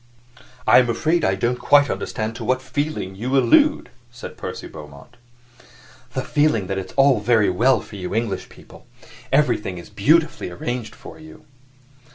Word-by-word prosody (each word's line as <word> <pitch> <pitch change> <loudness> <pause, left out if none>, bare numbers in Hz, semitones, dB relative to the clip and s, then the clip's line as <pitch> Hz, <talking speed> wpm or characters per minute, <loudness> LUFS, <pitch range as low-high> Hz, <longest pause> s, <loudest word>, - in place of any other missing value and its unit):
"I - - +7
am 125 -2 +1
afraid 160 +8 0
I 95 - +2
don't 120 +5 -1
quite 145 0 +4
understand 110 -3 -4
to - - -7
what 130 0 +1
feeling 130 -6 -4
you 125 +7 -1
allude," 300 - +3 0.2
said 120 0 -10
Percy - - -7
Beaumont. 75 +10 -13 1.0
"The 130 - -2
feeling 150 -9 +1
that 95 +1 -3
it's 95 0 -8
all 135 -3 +4
very 105 -2 +2
well 125 +9 +2
for 105 - -11
you 90 +1 -5
English 115 -3 -2
people. - - -17 0.4
Everything 135 -9 +1
is 85 - -11
beautifully 155 - +1
arranged 115 +6 -5
for - - -13
you." 155 0 -15
120 Hz, 160 wpm, -21 LUFS, 100-145 Hz, 1.0 s, I